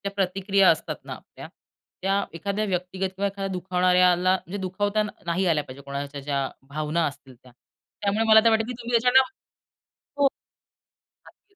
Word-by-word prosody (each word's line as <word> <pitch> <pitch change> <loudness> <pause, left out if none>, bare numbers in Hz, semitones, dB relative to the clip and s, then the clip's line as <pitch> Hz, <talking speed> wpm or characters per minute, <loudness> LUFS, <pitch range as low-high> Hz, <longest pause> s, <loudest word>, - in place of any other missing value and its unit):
प्रतिक्रिया 195 +1 +3
असतात - - 0
ना - - -6
आपल्या, - - -12 0.5
त्या 195 +1 +1 0.2
एखाद्या 200 +5 -2
व्यक्तिगत 185 0 -2
किंवा 200 +1 0
एखाद्या 195 0 -4
दुखावणाऱ्याला 180 0 +3
म्हणजे 190 +2 -6
दुखावता 205 +3 0 0.2
नाही 175 +3 0
आल्या 155 -4 +2
पाहिजे 130 +2 -11
कोणाच्या 140 0 -5
ज्या 140 0 -1 0.3
भावना 155 +3 -1
असतील 140 -3 -10
त्या. 125 +1 -20 0.5
त्यामुळे 205 +2 +1
मला 220 0 +9
तर - - +7
वाटतं 220 0 +2
की 250 - -4
तुम्ही 240 0 -7
त्याच्याला 250 +3 +5 1.0
हो. 285 - +3 1.0
अगदी. 400 - -22
185 Hz, 150 wpm, -25 LUFS, 165-205 Hz, 1.0 s, मला